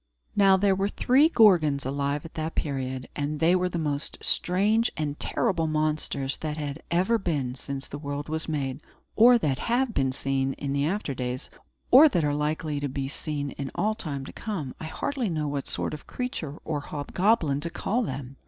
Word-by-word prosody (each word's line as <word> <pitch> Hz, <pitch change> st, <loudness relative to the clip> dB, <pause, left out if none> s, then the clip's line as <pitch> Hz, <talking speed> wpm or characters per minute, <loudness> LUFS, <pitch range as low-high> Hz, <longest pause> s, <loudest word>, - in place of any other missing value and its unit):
Now, 195 Hz, -2 st, +6 dB
there 195 Hz, 0 st, +3 dB
were 195 Hz, +1 st, 0 dB
three 270 Hz, +8 st, +4 dB
Gorgons 170 Hz, -, +4 dB
alive 140 Hz, +2 st, -1 dB
at 165 Hz, -, -10 dB
that 160 Hz, +1 st, -4 dB
period; 130 Hz, -3 st, -3 dB
and 145 Hz, +1 st, -2 dB
they 170 Hz, +3 st, +4 dB
were 180 Hz, 0 st, +1 dB
the 175 Hz, -, -3 dB
most 150 Hz, -3 st, -2 dB
strange 210 Hz, +6 st, +2 dB
and 150 Hz, -1 st, -3 dB
terrible 180 Hz, -9 st, 0 dB
monsters 155 Hz, -3 st, 0 dB
that 155 Hz, -1 st, -4 dB
had 145 Hz, 0 st, -4 dB
ever 190 Hz, +7 st, +2 dB
been 145 Hz, -10 st, -1 dB
since 135 Hz, +1 st, -6 dB
the 145 Hz, -, -7 dB
world 145 Hz, 0 st, -4 dB
was 160 Hz, +1 st, -2 dB
made, 135 Hz, -2 st, -2 dB, 0.3 s
or 240 Hz, +2 st, +7 dB
that 140 Hz, -, 0 dB
have 245 Hz, 0 st, +2 dB
been 135 Hz, -6 st, +1 dB
seen 135 Hz, 0 st, -1 dB
in 140 Hz, 0 st, -3 dB
after 175 Hz, -3 st, -1 dB
days, 125 Hz, 0 st, -4 dB, 0.4 s
or 290 Hz, +5 st, +9 dB
that 170 Hz, -, +1 dB
are 145 Hz, -, +1 dB
likely 150 Hz, 0 st, -1 dB
to 145 Hz, 0 st, -2 dB
be 135 Hz, +1 st, -3 dB
seen 145 Hz, 0 st, -4 dB
in 135 Hz, -, -3 dB
all 215 Hz, +1 st, +1 dB
time 145 Hz, -10 st, -5 dB
to -, -, -9 dB
come. 175 Hz, -, -4 dB
I -, -, -6 dB
hardly 245 Hz, -, -2 dB
know 155 Hz, -3 st, -1 dB
what 140 Hz, -1 st, -3 dB
sort -, -, 0 dB
of 150 Hz, -, -8 dB
creature 160 Hz, -, -4 dB
or 150 Hz, -2 st, -1 dB
hobgoblin 150 Hz, +1 st, 0 dB
to 165 Hz, +3 st, -2 dB
call 210 Hz, +7 st, -1 dB
them. 135 Hz, -, -5 dB
155 Hz, 190 wpm, -27 LUFS, 140-190 Hz, 0.4 s, or